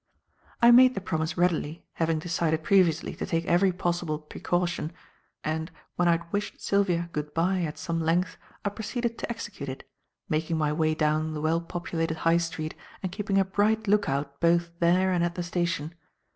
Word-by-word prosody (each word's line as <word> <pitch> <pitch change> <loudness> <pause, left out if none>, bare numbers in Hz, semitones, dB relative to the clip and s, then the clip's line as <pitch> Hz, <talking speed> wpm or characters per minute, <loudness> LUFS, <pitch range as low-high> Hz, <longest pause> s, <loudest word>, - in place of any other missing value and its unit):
I 235 - +9
made 255 +1 +7
the - - -1
promise 160 -3 -2
readily 170 -2 0
having 165 -1 0
decided 160 -1 0
previously 170 -4 +3
to - - -3
take 165 0 0
every 180 +2 +4
possible 175 -3 -1
precaution, 170 +2 -2 0.5
and, 160 +1 -2 0.3
when 175 - +2
I 170 - +6
had 170 0 -4
wished 205 +1 -2
Sylvia 175 -4 +1
"good 150 0 -4
bye" 180 +3 +2
at 155 -3 -3
some 165 -1 -2
length, 170 +3 +1 0.3
I - - +3
proceeded 230 +3 -3
to - - -4
execute 210 - -5
it; 130 - -8 0.4
making 160 +1 0
my 150 -1 +1
way 155 0 +1
down 155 +1 +1
the - - -3
well 160 +2 +1
populated 165 -1 -3
High 165 +1 +3
Street 165 -2 -3 0.3
and 185 - -2
keeping 200 +1 -1
a 195 - +4
bright 215 +3 +1
look 205 0 +3
out 140 +1 -2
both 170 0 +3
there 180 +2 +3
and 175 -2 +2
at 175 0 -1
the 175 - -2
station. 170 -2 -2
170 Hz, 185 wpm, -27 LUFS, 160-185 Hz, 0.5 s, I